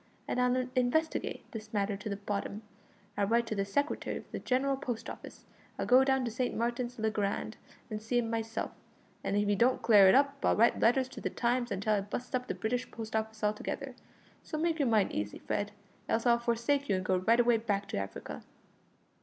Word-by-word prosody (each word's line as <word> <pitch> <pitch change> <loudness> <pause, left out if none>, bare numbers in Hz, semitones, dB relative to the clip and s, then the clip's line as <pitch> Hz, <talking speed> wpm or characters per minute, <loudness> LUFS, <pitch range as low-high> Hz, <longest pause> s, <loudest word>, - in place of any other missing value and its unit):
and 250 - 0
I'll 250 0 +2
investigate 260 +6 0
this 220 -1 -8
matter 200 0 +1
to 200 +2 -6
the 200 - -2
bottom. 200 +1 -4 0.5
I'll 200 -1 +1
write 235 +2 +3
to 225 - -3
the 195 -1 0
Secretary 285 +9 -1
of - - -12
the - - -4
General 270 +2 +1
Post 250 -4 -4
Office. - - -11 0.3
I'll - - -2
go 255 +2 +6
down 265 -1 +2
to 235 - -2
St. 250 +2 -1
Martin's 240 +1 -2
le 220 -1 0
Grand 210 +1 -2 0.3
and 215 -3 -5
see 230 +3 -1
him 240 -1 +1
myself, 225 0 -2 0.5
and 200 - 0
if 205 0 +2
he 205 - +3
don't 245 +5 +2
clear 205 -4 +7
it - - +6
up 280 0 +2
I'll - - +4
write 230 +2 +4
letters 255 +3 +3
to - - -9
the - - -1
Times 240 0 0
until 200 +2 0
I 205 - +2
bu'st 205 +5 -6
up 250 0 -1
the - - -2
British 245 +3 -2
Post 220 -1 -6
Office 220 0 -2
altogether; 210 0 -2 0.5
so 310 - -5
make 325 0 0
your 280 - +2
mind 215 -4 +3
easy, 105 0 -3
Fred, 205 0 -2 0.4
else 225 +1 +1
I'll 235 -1 +5
forsake 235 +4 0
you 200 - +3
and 185 0 -2
go 185 0 +2
right 225 +6 +3
away 240 -1 +5
back 205 -3 -1
to - - -3
Africa." 95 0 -5
230 Hz, 215 wpm, -31 LUFS, 205-250 Hz, 0.5 s, clear